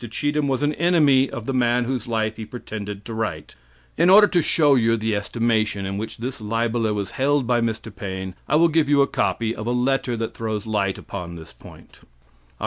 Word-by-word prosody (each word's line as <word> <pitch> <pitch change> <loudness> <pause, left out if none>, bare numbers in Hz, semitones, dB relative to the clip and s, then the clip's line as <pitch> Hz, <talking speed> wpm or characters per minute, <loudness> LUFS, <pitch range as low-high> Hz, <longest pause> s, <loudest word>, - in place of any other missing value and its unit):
Cheetham 145 +5 -1
was 135 +1 0
an 145 +1 +1
enemy 145 -6 +4
of 115 - -7
the 135 - -2
man 120 -1 +2
whose 125 -2 -3
life 110 -2 -1
he 110 - -5
pretended 105 -3 -7
to 115 - -6
write. 110 -1 -4 0.5
In 170 +2 +5
order 205 +2 +8
to 180 -4 +1
show 150 -2 +3
you 115 -3 +3
the 110 -1 -1
estimation 110 -1 0
in 100 +1 -3
which 110 +1 -6
this 125 +1 -5
libeler 115 +1 0
was 100 -2 -3
held 140 0 +1
by 120 0 +1
Mr. 110 -2 -3
Paine, 95 -1 -5 0.2
I 150 - +3
will 165 +2 +5
give 160 -2 +1
you 140 -1 +5
a - - 0
copy 115 -1 -1
of 110 - -6
a - - 0
letter 125 -1 0
that 115 0 -4
throws 110 -2 -4
light 100 -3 -1
upon 90 -3 -7
this 80 -1 -11
point: - - -16
"Oct. - - -24
115 Hz, 215 wpm, -22 LUFS, 110-135 Hz, 0.5 s, order